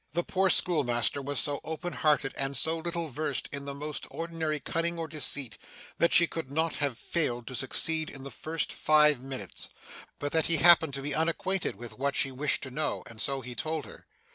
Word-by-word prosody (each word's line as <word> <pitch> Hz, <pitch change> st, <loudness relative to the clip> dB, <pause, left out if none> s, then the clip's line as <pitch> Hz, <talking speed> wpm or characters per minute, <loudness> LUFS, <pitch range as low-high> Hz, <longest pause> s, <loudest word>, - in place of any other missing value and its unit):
The 175 Hz, +2 st, 0 dB
poor 190 Hz, +2 st, +1 dB
schoolmaster 140 Hz, -8 st, +3 dB
was 140 Hz, +1 st, -2 dB
so 145 Hz, +1 st, +1 dB
open 165 Hz, +2 st, -5 dB
hearted, 150 Hz, -3 st, +2 dB
and 135 Hz, -1 st, 0 dB
so 160 Hz, +4 st, +3 dB
little 170 Hz, -1 st, -3 dB
versed 145 Hz, 0 st, -2 dB
in 140 Hz, 0 st, -4 dB
the 140 Hz, 0 st, -5 dB
most 150 Hz, +1 st, -5 dB
ordinary 165 Hz, -2 st, -3 dB
cunning 170 Hz, +3 st, -2 dB
or 165 Hz, -1 st, -3 dB
deceit, 140 Hz, -8 st, +2 dB, 0.4 s
that 170 Hz, -, +3 dB
she 170 Hz, -, +8 dB
could 165 Hz, -4 st, -6 dB
not 160 Hz, +2 st, 0 dB
have 140 Hz, -5 st, -2 dB
failed 120 Hz, -8 st, -1 dB
to 130 Hz, -, -7 dB
succeed 155 Hz, +4 st, +1 dB
in 135 Hz, -, -8 dB
the 140 Hz, -, -7 dB
first 160 Hz, +1 st, -2 dB
five 150 Hz, -3 st, +4 dB
minutes, 135 Hz, 0 st, -6 dB, 0.5 s
but 145 Hz, 0 st, -3 dB
that 160 Hz, -1 st, +2 dB
he 165 Hz, -, +2 dB
happened 160 Hz, -3 st, +6 dB
to 140 Hz, -, -4 dB
be 145 Hz, 0 st, -1 dB
unacquainted 165 Hz, -, -1 dB
with 115 Hz, +1 st, -10 dB
what 140 Hz, +1 st, 0 dB
she 135 Hz, -, +2 dB
wished 140 Hz, +3 st, -1 dB
to 130 Hz, -, -6 dB
know; 155 Hz, +4 st, -2 dB
and 115 Hz, -1 st, -8 dB
so 135 Hz, -1 st, -1 dB
he 125 Hz, 0 st, -8 dB
told 155 Hz, +4 st, -3 dB
her. -, -, -14 dB
150 Hz, 205 wpm, -29 LUFS, 135-165 Hz, 0.5 s, she